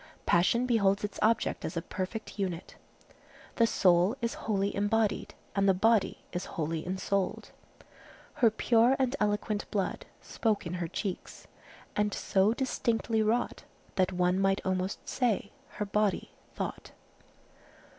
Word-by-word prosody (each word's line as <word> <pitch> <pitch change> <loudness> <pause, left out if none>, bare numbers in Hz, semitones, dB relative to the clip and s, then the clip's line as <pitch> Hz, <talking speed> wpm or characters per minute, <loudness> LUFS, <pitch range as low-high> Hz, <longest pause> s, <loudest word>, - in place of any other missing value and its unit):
Passion 205 +8 +3
beholds 200 -5 +2
its 205 - -4
object 225 +2 +1
as 180 - -4
a - - 0
perfect 205 +4 -5
unit. 180 -4 -3 0.8
The 230 - +5
soul 185 +3 +3
is 235 -1 -1
wholly 200 -2 -1
embodied, 210 +1 0 0.2
and 200 0 +3
the 190 - +4
body 220 +1 +2
is 180 +1 -3
wholly 160 0 -1
ensouled:— 190 +1 -2 0.9
"Her 230 - +7
pure 230 +3 +3
and 265 0 +1
eloquent 210 0 -1
blood 195 -3 -2
Spoke 220 -4 -1
in 170 - -4
her 170 - -1
cheeks, 190 +2 -5 0.5
and 210 0 +1
so 195 +2 +2
distinctly 230 -3 0
wrought, 225 +3 0 0.3
That 185 -1 +2
one 180 0 +1
might 195 0 +1
almost 185 +1 -2
say 225 -5 0 0.2
her 210 - -3
body 210 0 0 0.2
thought." - - -5
205 Hz, 135 wpm, -30 LUFS, 190-225 Hz, 0.9 s, Her